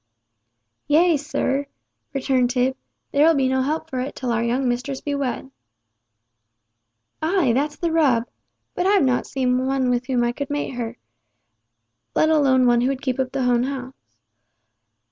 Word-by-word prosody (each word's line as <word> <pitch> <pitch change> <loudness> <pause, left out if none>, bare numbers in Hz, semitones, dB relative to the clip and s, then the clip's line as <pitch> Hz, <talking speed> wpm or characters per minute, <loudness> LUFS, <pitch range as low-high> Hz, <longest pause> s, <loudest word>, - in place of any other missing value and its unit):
"Yea, 325 +3 +4
sir," 285 -1 -1 0.4
returned 260 -3 +1
Tib, 255 +1 +1 0.4
"there'll 315 +3 +4
be 270 -2 +2
no 260 0 +1
help 310 +4 -2
for 260 -5 -4
it 255 +2 -4
till 250 -2 -3
our 230 0 0
young 250 +3 0
mistress 250 +3 -2
be 290 - -4
wed." 270 -1 -3 1.7
"Ay! 320 -5 +2
that's 290 +4 0
the 335 +2 -2
rub! 270 -8 +3 0.5
But 360 - 0
I've 395 -7 +4
not 250 -1 0
seen 255 -1 0
one 265 -2 +1
whom 245 -1 0
I 240 - +1
could 280 +3 -5
mate 290 0 -2
with 245 - -7
her—let 240 +5 -6
alone 270 -5 +4
one 240 -1 +4
who 250 - +2
would 270 0 -2
keep 260 -1 -2
up 260 -1 -1
the 260 -2 -1
old 245 0 +2
house. 260 -1 -5
265 Hz, 160 wpm, -22 LUFS, 250-290 Hz, 1.7 s, Yea